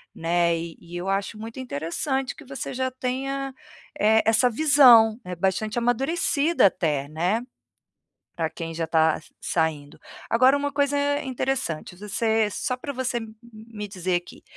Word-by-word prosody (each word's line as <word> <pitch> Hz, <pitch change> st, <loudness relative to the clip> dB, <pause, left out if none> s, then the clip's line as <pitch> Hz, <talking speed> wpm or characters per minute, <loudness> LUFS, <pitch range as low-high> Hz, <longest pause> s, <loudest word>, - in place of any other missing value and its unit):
né. 170 Hz, 0 st, +1 dB
E 165 Hz, 0 st, -7 dB
e 170 Hz, +1 st, -12 dB
eu 180 Hz, +2 st, -4 dB
acho 195 Hz, +2 st, -1 dB
muito 225 Hz, +3 st, -8 dB
interessante 255 Hz, -, -2 dB
que 305 Hz, -, -13 dB
você 270 Hz, 0 st, -6 dB
já 260 Hz, +1 st, -1 dB
tenha, 270 Hz, +2 st, -3 dB, 0.5 s
eh, 220 Hz, +1 st, +4 dB
essa 225 Hz, +3 st, +4 dB
visão, 245 Hz, -5 st, +6 dB
é 180 Hz, 0 st, -5 dB
bastante 195 Hz, +5 st, -1 dB
amadurecida 280 Hz, -, +2 dB
até, 150 Hz, -7 st, -1 dB
né, 175 Hz, +9 st, 0 dB, 1.0 s
para 165 Hz, -2 st, 0 dB
quem 165 Hz, -1 st, -6 dB
já 165 Hz, 0 st, -2 dB
tá 160 Hz, -1 st, +2 dB, 0.2 s
saindo. 155 Hz, -3 st, -2 dB, 0.3 s
Agora 255 Hz, +4 st, +5 dB
uma 285 Hz, 0 st, -2 dB
coisa 285 Hz, 0 st, +1 dB, 0.3 s
interessante, 255 Hz, -11 st, -3 dB
você 220 Hz, +2 st, 0 dB
só 250 Hz, +5 st, -2 dB
para 280 Hz, +3 st, -6 dB
você 255 Hz, -2 st, -2 dB, 0.3 s
me 215 Hz, -1 st, -8 dB
dizer 185 Hz, -2 st, -2 dB
aqui, 175 Hz, -, -7 dB
220 Hz, 145 wpm, -25 LUFS, 175-260 Hz, 1.0 s, visão